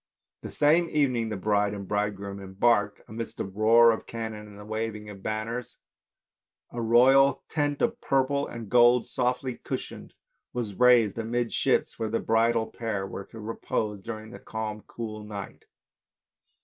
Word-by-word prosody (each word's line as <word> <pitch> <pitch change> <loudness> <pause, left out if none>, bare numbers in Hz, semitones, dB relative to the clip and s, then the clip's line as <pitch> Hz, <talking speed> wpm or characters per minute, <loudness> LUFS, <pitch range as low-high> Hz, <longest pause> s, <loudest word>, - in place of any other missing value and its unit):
That - - -8
same 165 +3 +3
evening 125 -7 +1
the 105 - -3
bride 105 +1 +1
and 100 -1 -7
bridegroom 100 -1 -2
embarked, 100 +3 +1
amidst 115 +1 -6
the - - -2
roar 110 +4 +5
of 110 - -4
cannon 110 -2 -6
and 105 -1 -13
the 105 - -10
waving 110 -1 -4
of 100 -1 -11
banners. 110 +4 -4 0.9
A 120 - -4
royal 130 +4 +5
tent 145 -2 -1
of 235 +1 0
purple 140 +1 +1
and 115 -2 -7
gold 120 +2 +5
softly 125 0 -1
cushioned - - -6 0.4
was 115 -4 -3
raised 120 -2 +4
amidships 120 +1 0
where 110 -1 -1
the 115 - 0
bridal 115 0 +2
pair 110 -4 -4
were 95 0 -7
to 115 - -12
repose 105 -1 -3
during 110 0 -7
the - - -10
calm 110 -1 -5
cool 110 -2 -6
night. 105 -2 -8
115 Hz, 150 wpm, -27 LUFS, 105-120 Hz, 0.9 s, roar